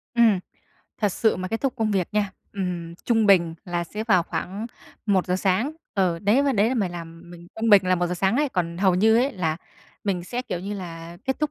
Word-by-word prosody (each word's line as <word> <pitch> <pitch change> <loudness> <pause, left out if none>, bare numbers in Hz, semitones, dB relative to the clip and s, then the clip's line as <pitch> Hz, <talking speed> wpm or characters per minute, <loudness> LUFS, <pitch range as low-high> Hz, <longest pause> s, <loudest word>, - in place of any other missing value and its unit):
Ừm. 225 -5 +5 0.6
Thật 205 - +3
sự 220 - +2
mà 185 0 -4
kết 225 - -2
thúc 270 -2 0
công 220 -2 0
việc 190 -4 0
nha, 205 -2 +1 0.2
ừm, 175 -4 -4
trung 225 -3 +3
bình 170 -4 +4
là 175 -1 -2
sẽ 215 +5 -5
vào 185 -6 +4
khoảng 200 +6 -4 0.4
1:00 185 -2 +2
sáng. 195 +10 +1 0.2
Ừ, 180 -4 +1
đấy 215 +9 +3
và 280 -1 +2
đấy 210 +2 +3
là 260 - 0
mày 200 -6 +1
làm 170 0 -9
mình 175 0 -12
trung 225 -1 +2
bình 200 -2 +8
là 185 - +4
1:00 175 0 -1
sáng 195 +6 +1
ấy, 295 -1 +2
còn 175 -6 -2
hầu 190 -2 +3
như 220 +4 +4
ấy 265 +4 +2
là 160 -6 -1 0.5
mình 180 -4 -1
sẽ, 245 +5 -3
kiểu 180 -9 -4
như 200 +2 -4
là, 170 -2 -8
kết 265 0 -1
thúc 305 -1 0
190 Hz, 230 wpm, -24 LUFS, 175-225 Hz, 0.6 s, bình